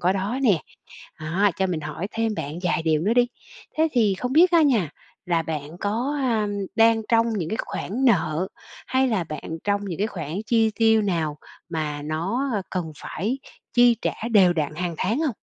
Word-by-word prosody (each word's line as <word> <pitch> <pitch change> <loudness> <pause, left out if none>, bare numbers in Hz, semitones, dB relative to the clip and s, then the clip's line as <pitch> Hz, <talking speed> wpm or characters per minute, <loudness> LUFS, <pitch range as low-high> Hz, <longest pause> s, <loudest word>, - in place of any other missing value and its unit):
có 180 +2 +3
đó 200 +6 -2
nè. 200 - +3 0.6
Đó, 180 +7 +2
cho 190 - +1
mình 175 -4 -2
hỏi 165 +5 -4
thêm 225 -1 0
bạn 150 -3 -5
vài 175 -2 +1
điều 155 -2 +2
nữa 215 +6 +2
đi, 245 -1 +4 0.5
thế 320 - +4
thì 215 -6 +3
không 250 +5 -2
biết 345 +5 +6
á 335 -2 +5
nha, 225 - +2 0.4
là 170 -2 +1
bạn 155 +1 -5
có, 240 +8 -1
ờm, 220 -5 +1 0.3
đang 225 0 +5
trong 230 0 +4
những 165 -4 -2
cái 220 - -1
khoản 245 +8 -3
nợ 185 -6 +2 0.4
hay 260 0 +2
là 200 -7 0
bạn 160 +1 -6
trong 205 0 0
những 180 -5 -5
cái 210 - +1
khoản 160 -8 -6
chi 225 -1 +3
tiêu 220 -1 +4
nào 165 -7 -1 0.3
mà 155 -3 -3
nó, 175 - -1
ơ, 200 - 0
cần 175 -4 -3
phải 220 +10 -3 0.3
chi 240 -1 +5
trả - - 0 0.2
đều 190 -5 +6
đặn 155 -3 -2
hàng 175 +1 -3
tháng 215 +7 0
hông? 300 -7 0
200 Hz, 200 wpm, -24 LUFS, 165-230 Hz, 0.6 s, biết